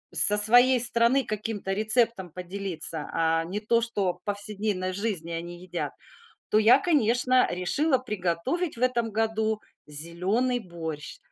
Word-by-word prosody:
со 210 Hz, -, +8 dB
своей 245 Hz, +4 st, +6 dB
страны 240 Hz, +3 st, +4 dB
каким-то 210 Hz, -2 st, -4 dB
рецептом 220 Hz, -2 st, +2 dB
поделиться, 180 Hz, -3 st, -3 dB
а 165 Hz, 0 st, 0 dB
не 190 Hz, +5 st, -5 dB
то, 230 Hz, +2 st, 0 dB
что 205 Hz, -6 st, -2 dB
в 180 Hz, -, -25 dB
повседневной 205 Hz, -2 st, -2 dB
жизни 190 Hz, -5 st, -3 dB
они 175 Hz, +1 st, -7 dB
едят, 185 Hz, -, -5 dB, 0.6 s
то -, -, +1 dB
я, 225 Hz, +4 st, +5 dB
конечно, 255 Hz, -4 st, +1 dB
решила 260 Hz, -, 0 dB
приготовить 215 Hz, -, -3 dB
в -, -, -9 dB
этом 240 Hz, -2 st, 0 dB
году 220 Hz, 0 st, -2 dB, 0.3 s
зелёный 180 Hz, -, -1 dB
борщ, 160 Hz, -6 st, -8 dB
210 Hz, 135 wpm, -25 LUFS, 180-235 Hz, 0.6 s, со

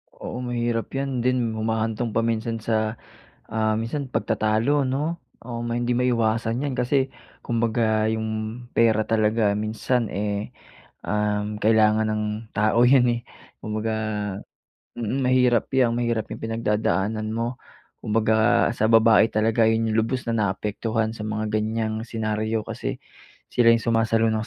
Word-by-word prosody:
Oo -, -, -6 dB
mahirap 120 Hz, -2 st, -1 dB
yan 135 Hz, -2 st, -2 dB
din 125 Hz, -1 st, +1 dB
humahantong 110 Hz, +1 st, -2 dB
pa 115 Hz, -, +2 dB
minsan 115 Hz, 0 st, -1 dB
sa, 110 Hz, -1 st, 0 dB, 0.5 s
ah, 110 Hz, 0 st, 0 dB
minsan 130 Hz, +6 st, -3 dB
pagtatalo 115 Hz, +7 st, +1 dB
no? 145 Hz, +6 st, -1 dB, 0.2 s
O 120 Hz, -1 st, -6 dB
may 120 Hz, 0 st, -2 dB
hindi 120 Hz, 0 st, 0 dB
maiwasan 115 Hz, -1 st, +1 dB
yan 140 Hz, -2 st, -2 dB
kasi 130 Hz, +2 st, +1 dB, 0.3 s
kumbaga 115 Hz, -2 st, +1 dB
yung 110 Hz, +2 st, -4 dB
pera 110 Hz, -2 st, +4 dB
talaga 110 Hz, -1 st, +2 dB
minsan 110 Hz, +2 st, -1 dB
eh, 100 Hz, +1 st, -3 dB, 0.5 s
um, 105 Hz, 0 st, -1 dB
kailangan 110 Hz, 0 st, +3 dB
ng 110 Hz, 0 st, -1 dB, 0.3 s
tao 115 Hz, +3 st, +4 dB
yun 125 Hz, -3 st, +4 dB
eh, -, -, -15 dB, 0.4 s
kumbaga, 110 Hz, +1 st, -3 dB, 1.0 s
mm, 120 Hz, +3 st, -2 dB
mahirap 125 Hz, -2 st, +3 dB
yan 130 Hz, -3 st, +2 dB
mahirap 120 Hz, -2 st, 0 dB
yang -, -, -7 dB
pinagdadaanan 110 Hz, -1 st, -1 dB
mo. 115 Hz, +3 st, -3 dB, 0.4 s
Kumbaga 110 Hz, +2 st, +2 dB
sa 110 Hz, -2 st, 0 dB
babae 115 Hz, -1 st, +6 dB
talaga 110 Hz, +1 st, +2 dB
yun 115 Hz, 0 st, +1 dB
yung 110 Hz, -, +1 dB
lubos 125 Hz, +3 st, -2 dB
na 115 Hz, -, -2 dB
naapektuhan 110 Hz, +1 st, -1 dB
sa 115 Hz, -, -11 dB
mga 110 Hz, 0 st, -2 dB
ganyang 110 Hz, 0 st, -2 dB
senaryo, 110 Hz, 0 st, -2 dB
kasi -, -, -4 dB, 0.6 s
sila 120 Hz, -1 st, +4 dB
yung 115 Hz, -, -1 dB
sumasalo 115 Hz, -1 st, +2 dB
ng 110 Hz, 0 st, -2 dB
115 Hz, 135 wpm, -24 LUFS, 110-120 Hz, 1.0 s, babae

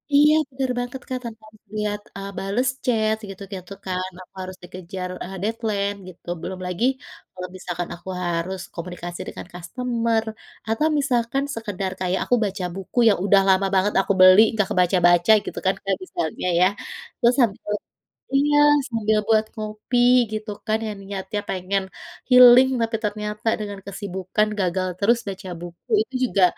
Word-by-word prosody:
Iya 300 Hz, +1 st, +7 dB, 0.2 s
benar 260 Hz, 0 st, -2 dB
banget 245 Hz, +2 st, -5 dB
Kak, 255 Hz, -1 st, -3 dB
tanpa 225 Hz, -1 st, -8 dB
harus 215 Hz, -, -23 dB
lihat, 210 Hz, 0 st, -1 dB, 0.2 s
eee, 195 Hz, 0 st, -6 dB
bales 205 Hz, +7 st, 0 dB, 0.2 s
chat 220 Hz, -3 st, +2 dB
gitu-gitu 195 Hz, -1 st, -9 dB
kan, 185 Hz, 0 st, -2 dB
aku -, -, -24 dB
harus 185 Hz, 0 st, -7 dB
dikejar, 180 Hz, 0 st, -7 dB
eee, 190 Hz, +1 st, -7 dB
deadline 210 Hz, -2 st, -1 dB
gitu, 180 Hz, -1 st, -14 dB
belum 185 Hz, 0 st, -5 dB
lagi 180 Hz, +7 st, -1 dB, 0.5 s
kalau 180 Hz, 0 st, -5 dB
misalkan 175 Hz, -1 st, -5 dB
aku 175 Hz, -, -18 dB, 0.2 s
harus 175 Hz, +2 st, -2 dB
komunikasi 175 Hz, 0 st, -7 dB
dengan -, -, -7 dB
customer, 230 Hz, +5 st, -1 dB, 0.4 s
atau 225 Hz, +8 st, +1 dB
misalkan 255 Hz, 0 st, 0 dB
sekedar 200 Hz, -4 st, -3 dB
kayak 185 Hz, 0 st, 0 dB
aku 245 Hz, -, +2 dB
baca 195 Hz, -1 st, -3 dB
buku 195 Hz, +5 st, -3 dB
yang 200 Hz, -, 0 dB
udah 200 Hz, -1 st, +5 dB
lama 190 Hz, 0 st, +4 dB
banget 190 Hz, +2 st, +2 dB
aku 200 Hz, -, 0 dB
beli, 185 Hz, +2 st, +9 dB
nggak 210 Hz, -3 st, +1 dB
kebaca-baca 175 Hz, +1 st, +4 dB
gitu -, -, -5 dB
kan 190 Hz, -, +3 dB
kayak 195 Hz, -1 st, 0 dB
misalnya 170 Hz, 0 st, -3 dB
ya, 185 Hz, -, +6 dB, 0.5 s
terus 245 Hz, 0 st, +4 dB
sambil 210 Hz, -3 st, +1 dB, 0.6 s
iya, 290 Hz, +1 st, +3 dB, 0.3 s
sambil 220 Hz, -3 st, +1 dB
buat 220 Hz, -1 st, +4 dB
ngopi 215 Hz, +3 st, -2 dB, 0.3 s
gitu 215 Hz, 0 st, -4 dB, 0.2 s
kan 215 Hz, 0 st, +2 dB
yang 210 Hz, -, -5 dB
niatnya 195 Hz, +1 st, -4 dB
pengen 190 Hz, +1 st, -1 dB, 0.5 s
healing, 250 Hz, 0 st, +9 dB
tapi 225 Hz, 0 st, 0 dB
ternyata 210 Hz, +1 st, -3 dB
dengan 205 Hz, -2 st, -5 dB
kesibukan 195 Hz, +1 st, -2 dB
gagal 185 Hz, 0 st, 0 dB
terus 230 Hz, +4 st, +3 dB
baca 190 Hz, -1 st, -6 dB
buku, 175 Hz, -, -11 dB
itu 435 Hz, -, -6 dB, 0.2 s
juga, 195 Hz, -, +3 dB
200 Hz, 155 wpm, -23 LUFS, 185-225 Hz, 0.6 s, beli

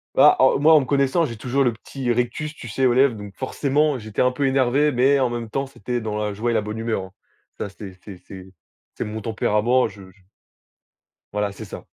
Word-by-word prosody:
Bah, -, -, +7 dB
heu, -, -, +5 dB
moi, 160 Hz, +2 st, +6 dB
en 150 Hz, -, +7 dB
me -, -, -4 dB
connaissant, 140 Hz, +4 st, +2 dB
j'ai 115 Hz, -5 st, -6 dB
toujours 130 Hz, +5 st, 0 dB
le 120 Hz, -, +2 dB
petit 120 Hz, +2 st, -4 dB
rictus, 125 Hz, +6 st, -2 dB
tu 120 Hz, -, -10 dB
sais, 130 Hz, +5 st, 0 dB
aux 125 Hz, -, +4 dB
lèvres 130 Hz, -2 st, +4 dB
donc 100 Hz, -1 st, -9 dB
forcément, 140 Hz, +2 st, 0 dB
j'étais 110 Hz, -2 st, -4 dB
un 125 Hz, 0 st, +3 dB
peu 140 Hz, +2 st, -1 dB
énervé 135 Hz, +2 st, +2 dB
mais 135 Hz, +3 st, +3 dB
en 125 Hz, -, +2 dB
même 120 Hz, -2 st, -5 dB
temps, 135 Hz, +3 st, -2 dB
c'était 120 Hz, -2 st, -4 dB
dans 105 Hz, -1 st, -3 dB
la 105 Hz, -1 st, -2 dB
joie 115 Hz, +4 st, -1 dB
et -, -, 0 dB
la 110 Hz, -, +2 dB
bonne 105 Hz, +1 st, -6 dB
humeur, 115 Hz, -3 st, -1 dB
hein. 95 Hz, -, -14 dB, 0.5 s
Ça, 100 Hz, -, -4 dB
c'était 95 Hz, -2 st, -11 dB
c'est 100 Hz, -4 st, -10 dB
c'est 95 Hz, 0 st, -12 dB, 0.4 s
c'est -, -, -3 dB
mon 110 Hz, +1 st, -5 dB
tempérament, 115 Hz, +3 st, +1 dB
je 100 Hz, -2 st, -13 dB
j 95 Hz, 0 st, -27 dB, 1.1 s
Voilà, 105 Hz, -1 st, -1 dB
c'est -, -, -9 dB
ça. -, -, -9 dB
120 Hz, 230 wpm, -22 LUFS, 105-135 Hz, 1.1 s, Bah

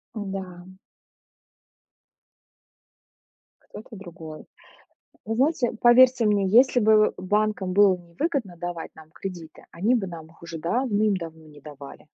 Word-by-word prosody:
М-да. 190 Hz, -3 st, -7 dB, 2.9 s
Кто-то 220 Hz, +1 st, -13 dB
другой. 170 Hz, -5 st, -11 dB, 0.8 s
Вы 225 Hz, -, -3 dB
знаете, 265 Hz, -1 st, +1 dB
поверьте 250 Hz, 0 st, +5 dB
мне, 205 Hz, -2 st, +2 dB
если 245 Hz, +4 st, +4 dB
бы 215 Hz, -1 st, +4 dB
банкам 205 Hz, 0 st, -1 dB
было 195 Hz, -1 st, +4 dB
невыгодно 185 Hz, -, -4 dB
давать 175 Hz, -1 st, -7 dB
нам 160 Hz, 0 st, -16 dB
кредиты, 170 Hz, -3 st, -9 dB
они 210 Hz, +9 st, +1 dB
бы 215 Hz, -6 st, -1 dB
нам 165 Hz, -3 st, -9 dB
их 165 Hz, +1 st, -23 dB
уже 165 Hz, -1 st, -8 dB
давным-давно 190 Hz, -, -2 dB
не 150 Hz, -1 st, -16 dB
давали. 145 Hz, 0 st, -12 dB
190 Hz, 115 wpm, -24 LUFS, 170-220 Hz, 2.9 s, поверьте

